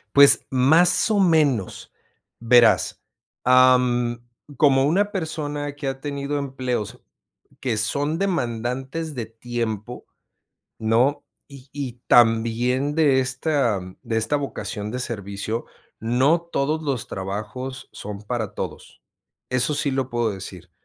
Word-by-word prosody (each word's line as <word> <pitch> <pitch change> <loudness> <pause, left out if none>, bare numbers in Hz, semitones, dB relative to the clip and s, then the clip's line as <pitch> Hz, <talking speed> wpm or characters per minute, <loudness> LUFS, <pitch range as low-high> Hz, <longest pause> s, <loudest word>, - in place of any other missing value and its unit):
Pues 140 0 +7
más 160 - +4
o 210 - +2
menos, 150 - +1 0.5
verás. 120 0 +4 0.4
Am, 125 -1 +4 0.4
como 135 -2 +4
una 200 +7 +2
persona 150 -5 -4
que 145 -1 -5
ha 135 0 -4
tenido 140 0 -3
empleos, 130 -6 -3 0.6
que 120 -4 -1
son 145 +9 0
demandantes 135 - -2
de 120 - -3
tiempo, 115 0 -5 0.7
¿no? 125 +6 +2 0.2
Y 140 -2 -14
y 135 -4 -4
también 120 +4 +3
de 145 -5 +4
esta 130 -3 0 0.2
de 115 -3 -2
esta 115 +6 0
vocación 120 -7 -4
de 125 - -4
servicio, 105 -1 -4 0.3
no 130 +9 +2
todos 155 -2 -1
los 140 -6 -3
trabajos 105 +7 -6
son 105 0 -8
para 110 -2 -3
todos. - - -7 0.5
Eso 125 +4 +1
sí 145 -1 0
lo 130 -1 -1
puedo 120 -2 0
decir, 90 -2 -9
130 Hz, 120 wpm, -23 LUFS, 115-145 Hz, 0.7 s, Pues